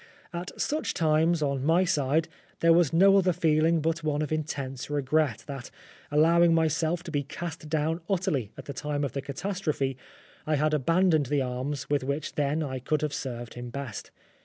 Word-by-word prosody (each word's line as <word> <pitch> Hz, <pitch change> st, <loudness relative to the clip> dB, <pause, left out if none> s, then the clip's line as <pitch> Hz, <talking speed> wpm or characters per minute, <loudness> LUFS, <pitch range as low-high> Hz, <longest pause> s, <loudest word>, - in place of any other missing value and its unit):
At 175 Hz, +2 st, -6 dB
such 305 Hz, +2 st, -1 dB
times 160 Hz, 0 st, +2 dB
on 140 Hz, -2 st, -1 dB
my 165 Hz, +5 st, +4 dB
side 155 Hz, -1 st, +1 dB, 0.3 s
there 165 Hz, 0 st, +6 dB
was 170 Hz, -4 st, +4 dB
no 195 Hz, +4 st, +6 dB
other 185 Hz, -1 st, +3 dB
feeling 160 Hz, -1 st, +2 dB
but 165 Hz, +1 st, -1 dB
one 150 Hz, -1 st, 0 dB
of 150 Hz, -, -5 dB
intense 140 Hz, -4 st, -3 dB
regret 145 Hz, -4 st, 0 dB
that, 135 Hz, -3 st, -7 dB, 0.4 s
allowing 165 Hz, +3 st, +5 dB
myself 160 Hz, +1 st, +1 dB
to 170 Hz, -, -7 dB
be 145 Hz, -2 st, 0 dB
cast 155 Hz, +2 st, -7 dB
down 160 Hz, +2 st, 0 dB
utterly 170 Hz, -, 0 dB
at -, -, -9 dB
the 140 Hz, -, -6 dB
time 145 Hz, +1 st, -2 dB
of 140 Hz, -, -1 dB
the 140 Hz, -, -3 dB
catastrophe, 145 Hz, -2 st, -2 dB, 0.5 s
I 155 Hz, -, +2 dB
had 155 Hz, +1 st, +1 dB
abandoned 160 Hz, +1 st, +3 dB
the 145 Hz, 0 st, +1 dB
arms 130 Hz, +3 st, -3 dB
with 145 Hz, -2 st, 0 dB
which 140 Hz, +3 st, -3 dB
then 150 Hz, +2 st, 0 dB
I 130 Hz, -3 st, -4 dB
could 150 Hz, +4 st, -1 dB
have 150 Hz, -1 st, -1 dB
served 120 Hz, -4 st, -5 dB
him 120 Hz, 0 st, -7 dB
best. 130 Hz, -3 st, -6 dB
150 Hz, 185 wpm, -27 LUFS, 140-165 Hz, 0.5 s, there